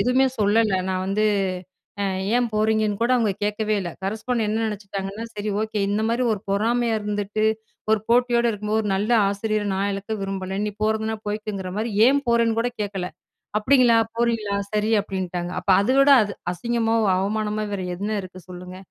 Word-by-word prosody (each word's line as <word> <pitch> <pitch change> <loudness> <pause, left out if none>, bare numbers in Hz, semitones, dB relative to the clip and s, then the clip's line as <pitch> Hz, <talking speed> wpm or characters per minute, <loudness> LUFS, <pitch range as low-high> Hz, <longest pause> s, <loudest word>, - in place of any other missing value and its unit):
எதுவுமே 255 +2 +3
சொல்லல, 210 -1 +3
நான் 185 0 -1
வந்து, 210 +2 +1 0.8
அ - - +1 0.3
ஏன் 245 -1 +1
போறீங்கன்னு 215 -1 +1
கூட 240 - +2
அவுங்க 220 -4 +1
கேட்கவே 210 +1 0
இல்ல, 175 -2 -4
கரஸ்பாண்டன்ட் 220 +3 -1
என்ன 220 +1 0
நெனச்சுக்கிட்டாங்கன்னா, 200 0 -5
"சரி 210 0 -4
ஓகே 215 -1 -2
இந்த 210 +2 0
மாரி 235 +2 0
ஒரு 200 - -3
பொறாமையா 230 +3 +1
இருந்துட்டு, 210 +1 -2 0.5
ஒரு 220 - +3
போட்டியோடு 240 0 +3
இருக்கும்போது 210 +1 -1
ஒரு 210 - -3
நல்ல 210 +4 -1 0.2
ஆசிரியர 210 +1 -1
நான் 200 +1 0
இழக்க 200 +3 -5
விரும்பல, 195 -1 -4
நீ - - -1
போறதுனா 220 0 0
போய்க்கங்கற 205 -3 -4
மாரி 225 +1 -1 0.2
"ஏன் 280 +2 +4
போறேன்னு 230 -1 +3
கூட 240 +2 +1
கேட்கல, 195 -3 -3 0.5
"அப்படிங்களா, 245 0 +5 0.2
போறீங்களா, 230 -4 0 0.2
சரி" 210 +1 +1
அப்படின்ட்டாங்க. 180 -3 -4
அப்ப 195 - -1
அத 200 - -1
விட 275 +1 +6
அது 205 -1 -3 0.2
அசிங்கமாவு, 225 +2 0
அவமானமா 210 +2 -1
வேற 190 -2 -2
என்ன 205 +3 -3
இருக்குது 185 -1 -12
சொல்லுங்க. 180 0 -9
215 Hz, 165 wpm, -23 LUFS, 200-225 Hz, 0.8 s, விட